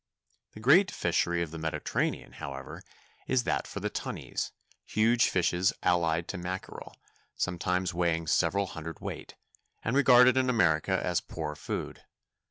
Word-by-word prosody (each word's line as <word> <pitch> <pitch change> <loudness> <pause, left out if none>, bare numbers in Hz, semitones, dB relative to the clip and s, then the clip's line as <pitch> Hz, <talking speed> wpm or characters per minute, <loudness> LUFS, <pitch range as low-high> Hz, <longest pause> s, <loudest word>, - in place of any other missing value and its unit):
The - - -10
great 160 - +5
fishery 85 0 0
of 80 - -7
the 80 - -7
Mediterranean, 80 0 -2
however, 70 -2 -8 0.5
is 130 -2 +2
that - - -1
for - - -6
tunnies—huge 115 +3 -1
fishes 90 +1 +2
allied 85 -1 +2
to 100 - -4
mackerel, 90 +2 -6 0.4
sometimes 90 0 -1
weighing 85 -1 0
several 90 +3 +2
hundredweight, 80 -3 -7 0.5
and 115 - -1
regarded 125 -2 +6
in 130 -1 +2
America 80 -11 +2
as - - +1
poor 75 -2 -5
food. - - -5
90 Hz, 125 wpm, -29 LUFS, 80-115 Hz, 0.5 s, regarded